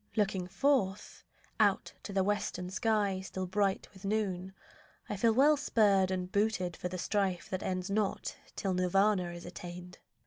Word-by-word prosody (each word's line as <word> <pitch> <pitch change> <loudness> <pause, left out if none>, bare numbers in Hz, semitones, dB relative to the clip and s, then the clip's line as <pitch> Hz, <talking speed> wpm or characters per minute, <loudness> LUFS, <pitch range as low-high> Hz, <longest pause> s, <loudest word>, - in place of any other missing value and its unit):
Looking 195 -4 0
forth, 210 -3 0 0.4
Out - - +2
to - - -7
the 195 -1 +2
western 185 -3 -1
sky 205 -3 +1
still 190 0 -4
bright 195 +1 0
with 190 0 -15
noon, 195 -3 -1 0.6
I - - -3
feel 225 +4 +3
well 280 +6 +5
spurred 205 -8 +3
and 185 -1 -2
booted 200 -4 0
for 180 - -4
the 185 - -4
strife 190 +1 -1
That 185 - -2
ends 185 +1 -2
not 205 -1 -1 0.2
till 195 -2 -1
Nirvana 185 0 +2
is 175 0 -9
attained. 175 0 -9
190 Hz, 160 wpm, -32 LUFS, 180-210 Hz, 0.6 s, well